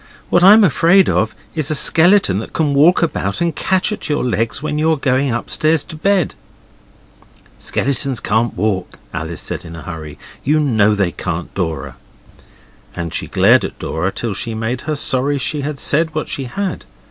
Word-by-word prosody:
'What 175 - +4
I'm 210 +4 +8
afraid 185 +2 +4
of 110 0 0 0.2
is 155 -2 0
a 155 - +1
skeleton 165 - +4
that 110 - -8
can 150 -3 0
walk 160 +6 +4
about 100 -12 -1
and 170 -3 -1
catch 190 +2 0
at 210 - -5
your 150 -2 0
legs 115 +1 -1
when 150 -1 -2
you're 160 0 +2
going 135 -1 +1
upstairs 155 +6 0
to 160 - -10
bed.' 195 +3 +1 1.3
'Skeletons 135 -1 -1
can't 110 +1 0
walk,' 95 -2 -2 0.2
Alice 80 0 -5
said - - -4
in 85 0 -10
a 80 - -9
hurry; 80 -4 -8 0.3
'you 150 +3 +2
know 110 -8 +2
they 100 -4 0
can't, 85 -1 -5
Dora.' 80 -8 -4 1.0
And 85 -1 -5
she - - -3
glared - - +4
at - - -5
Dora 90 +4 -2
till 110 +2 -4
she 110 +3 -3
made 115 +3 -3
her 155 - 0
sorry 140 0 +1
she 145 +3 -2
had 145 0 -4
said 160 +3 0
what 155 - -2
she 135 - -4
had. 190 +7 -4
135 Hz, 180 wpm, -17 LUFS, 100-155 Hz, 1.3 s, I'm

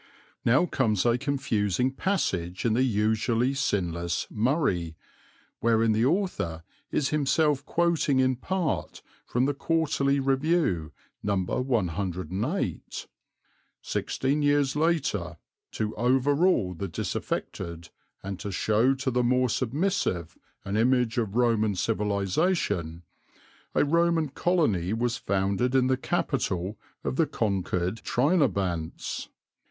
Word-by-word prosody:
Now 130 +9 +4
comes 110 - +1
a 120 -1 +4
confusing 130 -4 0
passage 95 - -1
in 115 - +3
the 120 - +2
usually 115 +2 +1
sinless 85 -10 -1
"Murray," 105 - 0 0.6
wherein 115 -1 +3
the 110 +3 +3
author 100 - -1 0.3
is 140 - 0
himself 150 -1 +2
quoting 170 -5 +2
in 130 0 +3
part 185 +5 -2 0.2
from 125 +2 +1
the 145 - +1
Quarterly 140 -2 +1
Review, 135 - +1 0.3
No. 100 -1 0
108: 95 - -2 0.8
"Sixteen 140 +3 -1
years 145 -2 +2
later, 135 - 0 0.3
'to 110 0 -2
overawe 130 - +2
the 100 +3 -4
disaffected, 85 0 -4 0.3
and 95 -1 -5
to 100 - -5
show 110 +7 +2
to 135 0 -2
the 125 0 +1
more 125 +1 +2
submissive 130 - -1 0.3
an 100 +2 -1
image 120 0 +2
of 110 -3 -2
Roman 115 -4 +2
civilization,' 100 - 0 0.7
a - - +4
Roman 170 0 +2
Colony 130 - +1
was 120 +1 0
founded 100 +6 0
in 130 -1 +4
the 130 0 +3
capital 120 - -2 0.2
of 130 - -2
the 165 - +3
conquered 95 -2 -1
Trinobantes. 100 - 0
120 Hz, 110 wpm, -27 LUFS, 100-140 Hz, 0.8 s, Now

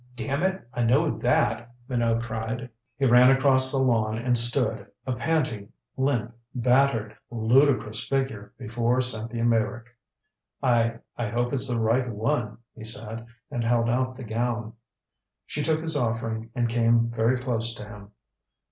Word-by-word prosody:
"Damn 135 +5 -2
it, 190 -7 -1
I 120 - -2
know 135 +7 +3
that," 120 0 +1
Minot 115 -2 0
cried. 115 +1 -4 0.3
He 135 - +1
ran 125 0 +7
across 135 -1 +5
the 135 - 0
lawn 115 -4 +1
and 120 +1 +1
stood, 120 0 +1 0.2
a 130 - -2
panting, 120 -6 -1 0.2
limp, 125 -4 0 0.2
battered, 125 -3 +2
ludicrous 120 -1 +2
figure 130 -6 -2
before 120 +3 0
Cynthia 115 -1 -1
Meyrick. 120 +1 0 0.7
"I 115 -2 +2 0.2
I 120 -3 -2
hope 120 +3 -1
it's 135 -1 0
the 120 -2 -1
right 120 +3 +1
one," 110 0 -1 0.2
he 115 - -10
said, 115 +1 -5 0.2
and 120 - -2
held 115 0 +2
out 130 +1 -1
the 130 - -8
gown. 115 0 -2 0.7
She 150 - -4
took 155 +1 +1
his 160 -1 -2
offering, 115 -3 -2
and 120 -1 +1
came 115 0 +2
very 115 +2 +1
close 115 -2 -1
to 105 -2 -8
him. 105 -2 -11
120 Hz, 150 wpm, -26 LUFS, 115-130 Hz, 0.7 s, ran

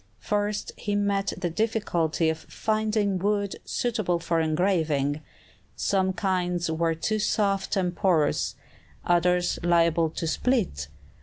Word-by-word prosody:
First 210 0 -2
he 205 -1 -2
met 200 -1 +1
the 180 -2 -2
difficulty 175 -6 0
of 160 - -5
finding 215 -1 -1
wood 200 +1 0
suitable 215 -8 0
for 165 0 0
engraving. 155 -4 +1 0.5
Some 190 -1 +1
kinds 180 -3 0
were 165 0 +1
too 215 +6 -1
soft 200 -2 +1
and 180 -2 0
porous, 170 -7 +1 0.5
others 175 0 +2
liable 170 -1 +3
to 165 - -4
split. 175 - 0
180 Hz, 120 wpm, -26 LUFS, 165-205 Hz, 0.5 s, liable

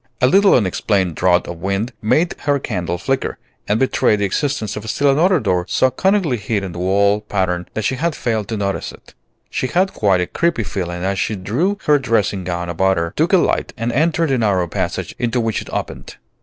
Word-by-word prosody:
A - - +4
little 195 +9 +5
unexplained 95 -3 +1
draught 90 +2 +2
of 85 -1 -7
wind 100 +6 -2
made 155 +11 +2
her 145 -1 +1
candle 90 -9 -3
flicker, 135 +9 -2 0.3
and 105 +2 +1
betrayed 130 -4 +2
the 100 - 0
existence 115 0 -2
of 110 +1 -6
still 140 +4 +2
another 175 +5 +3
door 90 -7 0
so 130 - +2
cunningly 190 - +1
hid 110 -2 -2
in 95 - -5
the 85 - -7
wall 100 +3 +2
pattern 95 -4 -2
that 110 - -2
she 130 - 0
had 165 +2 -1
failed 110 -4 -2
to 110 - -3
notice 100 -1 -2
it. - - -17 0.4
She 130 - -1
had 190 +7 +1
quite 100 -4 +2
a - - 0
creepy 170 - 0
feeling 90 -3 -4
as 95 +1 -1
she 110 - -1
drew 125 - -1
her 150 -1 +4
dressing 110 -6 0
gown 85 0 -3
about 95 +3 +1
her, 85 0 -2
took - - +1
a - - +6
light, - - 0
and 115 +2 -1
entered 160 +4 +1
the 130 -2 +1
narrow 95 -5 +1
passage - - -3
into 120 0 0
which 115 -2 -1
it - - -11
opened. - - -5
105 Hz, 210 wpm, -19 LUFS, 95-135 Hz, 0.4 s, a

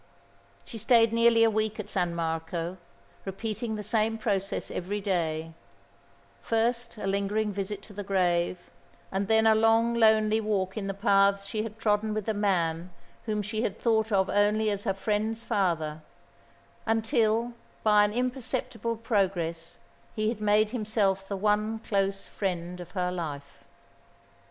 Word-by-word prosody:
She 225 - -8
stayed 230 0 +4
nearly 230 0 +5
a 225 - +5
week 215 0 -1
at 210 - -5
San 180 -4 -1
Marco, 165 +2 -3 0.5
repeating 220 +3 -4
the 210 - -5
same 225 0 +1
process 200 -4 -1
every 200 +4 -3
day; 165 -5 -1 0.9
first 235 +1 0
a 210 - -5
lingering 200 +2 0
visit 200 0 -4
to 210 - -12
the 205 +1 -5
grave, 180 -2 0 0.4
and 195 +1 -1
then 220 0 +4
a 220 - +6
long, 225 +1 +3
lonely 220 -1 +4
walk 195 -3 -1
in 205 -3 -3
the 195 - -3
paths 200 -1 +3
she 215 - -3
had 220 0 -6
trodden 215 -1 +1
with 215 -2 -2
the 220 - 0
man 175 -4 0 0.4
whom 210 -1 -1
she 215 +2 -3
had 210 -3 -2
thought 220 -1 +1
of 190 -1 +3
only 210 +1 +2
as 205 +1 -3
her 195 -3 0
friend's 215 +3 -1
father, 160 -7 -1 0.9
until 225 +1 +1 0.3
by 210 -1 +5
an 205 - +1
imperceptible 250 -1 -2
progress 185 -7 -1 0.4
he 215 0 +1
had 225 -2 -4
made 210 +1 +3
himself 210 -4 0
the 200 - -3
one 210 +2 +1
close 195 -3 -1
friend 180 -2 -4
of 175 -1 -8
her 180 0 0
life. 145 -5 -6
210 Hz, 150 wpm, -28 LUFS, 190-220 Hz, 0.9 s, a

